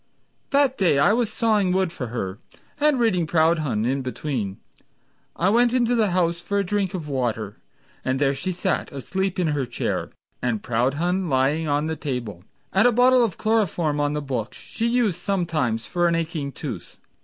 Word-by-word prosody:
That 280 -2 +2
day 175 -7 +3
I 170 +9 +4
was 230 -2 0
sawing 215 -5 +2
wood 185 -2 +1
for 130 -7 -5
her, 105 -4 -4 0.4
And 295 -3 +3
reading 185 -8 +2
Proudhon 155 -9 +2
in 135 +3 0
between. 125 -6 -3 0.8
I 180 - +2
went 240 +3 +4
in 255 -1 +3
the 230 -3 +2
house 170 -1 +1
for 200 +3 -2
a 200 - +2
drink 195 -1 -1
of 165 -5 -5
water, 115 -7 -2 0.5
And 130 0 0
there 140 0 +2
she 160 +7 -3
sat 185 +1 -2
asleep 190 +7 -3
in 175 -3 +1
her 145 -4 -1
chair, 120 - -2 0.3
And 115 -4 -1
Proudhon 155 +10 0
lying 140 +4 +1
on 145 +1 +1
the 160 0 -2
table, 125 - -5 0.3
And 195 +6 +5
a - - +4
bottle 250 +1 +5
of 220 -7 -1
chloroform 180 -9 +1
on 145 0 +1
the 150 -1 -2
book, 125 -5 -3
She 230 - -3
used 235 -7 +1
sometimes 160 - -1
for 175 -1 +1
an 170 - +2
aching 160 -4 -2
tooth! - - -7
165 Hz, 180 wpm, -23 LUFS, 135-200 Hz, 0.8 s, And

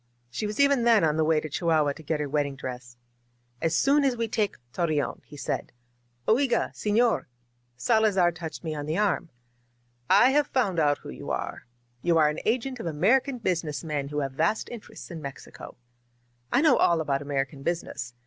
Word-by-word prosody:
She 210 - -3
was 210 +4 -5
even 280 -3 +4
then 230 -5 +5
on 155 -1 +2
her 160 - +3
way 155 0 +3
to 155 - -5
Chihuahua 155 -1 +1
to 160 - -12
get 155 0 -2
her 150 - -2
wedding 145 -1 -1
dress. 125 -2 -8 0.6
^^As 165 -1 +1
soon 280 - +3
as 260 -3 +1
we 230 0 -1
take 215 -2 -1 0.2
Torreon," 155 -4 -1
he 145 - -12
said. - - -3 0.6
Oigaj 250 +2 +2
seflorr* 215 - +1 0.5
Salazar 200 - +3
touched 165 -1 -7
me 160 -2 -3
on 145 -1 -5
the 155 +3 -1
arm. 195 -5 +1 0.8
"I 205 +7 +6
have 295 0 +3
found 200 -10 0
out 145 -2 +3
who - - -11
you 65 - -8
are. - - -4 0.3
You 170 -1 +2
are 155 -2 +5
an 150 - -3
agent 250 +2 -1
of 200 - -4
American 240 - +2
business 165 - -2
men 150 -3 -2
who 150 +1 -2
have 135 -1 -2
vast 210 +11 0
interests 230 -5 -10
in 165 -2 -7
Mex 140 -2 -7
ico. - - -11 0.8
I 270 - +4
know 315 - +5
all 170 -1 +3
about 140 -3 -1
American 140 -1 -3
business. 135 -6 -4
165 Hz, 190 wpm, -27 LUFS, 145-220 Hz, 0.8 s, I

